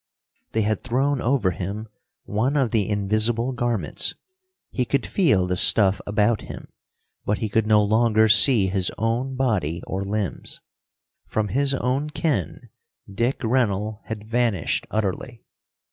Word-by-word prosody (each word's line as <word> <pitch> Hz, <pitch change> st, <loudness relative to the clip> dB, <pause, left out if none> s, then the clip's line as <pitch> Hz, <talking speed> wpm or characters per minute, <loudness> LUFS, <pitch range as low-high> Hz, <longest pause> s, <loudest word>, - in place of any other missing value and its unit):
They 110 Hz, -, +1 dB
had 110 Hz, +1 st, -1 dB
thrown 130 Hz, +2 st, -1 dB
over 120 Hz, -7 st, +1 dB
him 100 Hz, +5 st, -5 dB, 0.4 s
one 125 Hz, +8 st, -1 dB
of 130 Hz, -5 st, +1 dB
the 110 Hz, -5 st, 0 dB
invisible 110 Hz, +4 st, 0 dB
garments. 120 Hz, -, -2 dB, 0.6 s
He 125 Hz, -, -1 dB
could 130 Hz, -1 st, -1 dB
feel 105 Hz, -, +2 dB
the 90 Hz, 0 st, -1 dB
stuff 100 Hz, +1 st, +6 dB
about 105 Hz, +2 st, +1 dB
him, -, -, -10 dB, 0.5 s
but 105 Hz, -, -1 dB
he 110 Hz, -, -3 dB
could 110 Hz, +1 st, 0 dB
no 105 Hz, -1 st, +4 dB
longer 110 Hz, +1 st, +3 dB
see 110 Hz, 0 st, +5 dB
his 95 Hz, -1 st, 0 dB
own 120 Hz, +4 st, -2 dB
body 100 Hz, -, -1 dB
or 95 Hz, +1 st, -4 dB
limbs. 100 Hz, -1 st, -4 dB, 0.7 s
From 105 Hz, -1 st, -2 dB
his 140 Hz, +3 st, +1 dB
own 135 Hz, +4 st, -1 dB
ken, 145 Hz, -, -3 dB, 0.4 s
Dick 120 Hz, +7 st, -1 dB
Rennell 110 Hz, -3 st, -1 dB
had 105 Hz, -1 st, -7 dB
vanished 115 Hz, -7 st, -1 dB
utterly. 110 Hz, +3 st, -4 dB
110 Hz, 140 wpm, -23 LUFS, 100-125 Hz, 0.7 s, stuff